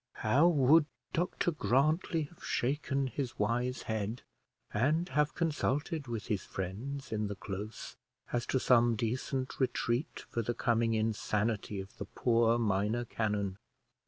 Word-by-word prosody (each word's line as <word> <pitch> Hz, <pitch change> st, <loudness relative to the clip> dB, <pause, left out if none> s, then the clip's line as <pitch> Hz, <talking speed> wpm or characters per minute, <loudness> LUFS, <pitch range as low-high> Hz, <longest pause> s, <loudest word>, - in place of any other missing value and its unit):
How 130 Hz, +10 st, +4 dB
would 150 Hz, -1 st, +5 dB, 0.3 s
Dr 175 Hz, 0 st, 0 dB
Grantly 155 Hz, -, +2 dB
have 150 Hz, +3 st, -12 dB
shaken 140 Hz, +1 st, 0 dB
his 130 Hz, -1 st, -4 dB
wise 120 Hz, +4 st, 0 dB
head, 110 Hz, +2 st, -3 dB, 0.5 s
and 150 Hz, +10 st, +2 dB
have 150 Hz, 0 st, +1 dB
consulted 155 Hz, -2 st, -1 dB
with 115 Hz, -2 st, -4 dB
his 105 Hz, -3 st, -1 dB
friends 115 Hz, +10 st, -5 dB
in 105 Hz, -1 st, 0 dB
the 100 Hz, -, -4 dB
close 100 Hz, +2 st, -6 dB, 0.4 s
as 120 Hz, 0 st, 0 dB
to 130 Hz, -, +1 dB
some 120 Hz, -2 st, +4 dB
decent 130 Hz, +4 st, -2 dB
retreat 125 Hz, 0 st, -1 dB
for 115 Hz, -, -2 dB
the 120 Hz, +2 st, -2 dB
coming 115 Hz, -1 st, +2 dB
insanity 110 Hz, -1 st, 0 dB
of 95 Hz, +1 st, -8 dB
the 100 Hz, -, -5 dB
poor 115 Hz, +2 st, +2 dB
minor 110 Hz, +2 st, +1 dB
canon! 105 Hz, -4 st, -1 dB
120 Hz, 135 wpm, -32 LUFS, 110-140 Hz, 0.5 s, would